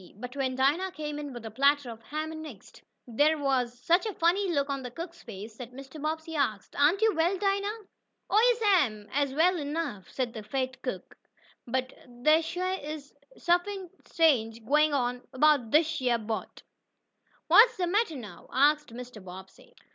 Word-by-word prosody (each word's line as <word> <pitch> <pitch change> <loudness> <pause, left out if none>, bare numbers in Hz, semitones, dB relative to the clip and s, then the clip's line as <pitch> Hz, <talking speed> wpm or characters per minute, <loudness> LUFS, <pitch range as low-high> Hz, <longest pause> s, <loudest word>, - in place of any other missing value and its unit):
But 250 +5 -8
when 265 -2 -1
Dinah 305 +9 +1
came 300 -1 -5
in 290 -1 -6
with 240 -3 -9
a 220 - -6
platter 280 +1 +2
of 225 0 -11
ham 310 +6 -4
and 315 0 -7
eggs, 225 -10 -13 0.3
there 290 +7 +2
was 260 -4 0
such 345 - +2
a 420 - -4
funny 365 +4 +2
look 280 -3 +1
on 275 -1 -3
the 250 - -6
cook's 335 +6 -8
face 215 -1 -9
that 250 -1 -9
Mrs. 275 +3 -10
Bobbsey 320 +1 -3
asked: 220 -9 -1
"Aren't 325 +9 +3
you 445 -1 +4
well, 340 +4 +1
Dinah?" 400 +2 -1 0.5
"Oh, 460 +3 +4
yes'm, 270 - +2
I'se 280 -1 +1
well 355 +4 +4
enough," 290 - -4
the 240 -4 -2
fat 260 +4 -3
cook 225 -8 -5
answered. - - -43 0.7
"But 245 -1 -18
dey 310 +2 +6
shuah 365 +2 -3
is 295 -1 -7 0.2
suffin 355 +1 0 0.2
strange 230 -9 +2
gwine 300 +4 +4
on 250 -2 0
abo'd 285 -4 +4
dish 310 +2 +2
yeah 245 -2 +2
boat." 220 0 -5 0.8
"What's 460 +2 +7
the 365 - 0
matter 390 -1 +1
now?" 210 -9 -10
asked 295 +1 +3
Mr. 245 -3 -9
Bobbsey. 190 - -12
285 Hz, 175 wpm, -28 LUFS, 245-335 Hz, 0.8 s, What's